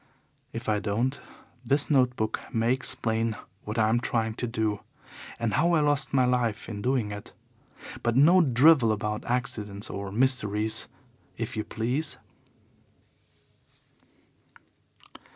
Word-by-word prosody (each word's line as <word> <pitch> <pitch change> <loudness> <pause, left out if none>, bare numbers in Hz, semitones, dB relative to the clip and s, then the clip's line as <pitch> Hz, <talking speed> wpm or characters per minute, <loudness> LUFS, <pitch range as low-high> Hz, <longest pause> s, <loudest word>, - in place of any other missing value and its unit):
If 115 +1 -7
I 105 -1 +2
don't 115 +7 -1 0.4
this 140 +5 +1
note 125 -3 +3
book 110 -2 -2
may 115 +2 +2
explain 115 -4 -1 0.3
what 105 +2 -5
I 110 -1 +3
am 115 +2 +2
trying 115 -2 0
to 120 - -3
do, 110 -3 -1 0.6
and 115 -3 -1
how 170 +8 +3
I 165 - +4
lost 145 -1 +1
my 130 -2 +3
life 120 -4 0
in 105 -3 -6
doing 125 -3 0
it. 105 0 -8 0.7
But 120 -1 0
no 170 +7 +6
drivel 135 -3 +5
about 105 0 -2
accidents 110 -5 -3
or 100 0 -5
mysteries, 110 -3 +1 0.5
if - - -4
YOU 110 - -2
please. 125 +9 -2
115 Hz, 130 wpm, -27 LUFS, 110-130 Hz, 0.7 s, no